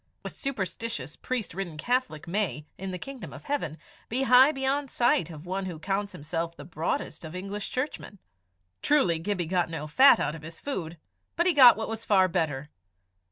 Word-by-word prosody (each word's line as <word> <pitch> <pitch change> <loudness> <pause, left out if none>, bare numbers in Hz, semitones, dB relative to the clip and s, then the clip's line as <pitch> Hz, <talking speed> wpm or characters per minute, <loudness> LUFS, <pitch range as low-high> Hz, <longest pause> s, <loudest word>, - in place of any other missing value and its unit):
A - - -3
superstitious 195 - -4
priest 250 -8 -3
ridden 175 -4 -5
Catholic 240 - -1
may, 170 - -1
in 190 +1 -6
the 185 - -4
kingdom 250 -3 -8
of - - -10
heaven, 225 - -2 0.3
be 255 +4 +1
high 260 +3 +7
beyond 275 0 -1
sight 235 -11 +2
of 155 -1 -10
one 190 +2 -3
who 175 -3 -5
counts 200 +4 -2
himself 165 +3 -4
the 145 - -9
broadest 165 +1 -3
of 160 +2 -8
English 200 +2 -5
churchmen. 255 -5 -4 0.6
Truly 265 - +3
Gibbie 180 0 -2
got 175 0 0
no 160 -2 -4
fat 260 - +6
out - - -1
of 160 - -8
his 165 +1 -9
food, 175 - -4 0.4
but 345 - +2
he 365 - +4
got 250 -6 +9
what 220 - -3
was 225 0 -5
far 190 -4 +4
better. 150 -4 -2
190 Hz, 185 wpm, -28 LUFS, 165-250 Hz, 0.6 s, got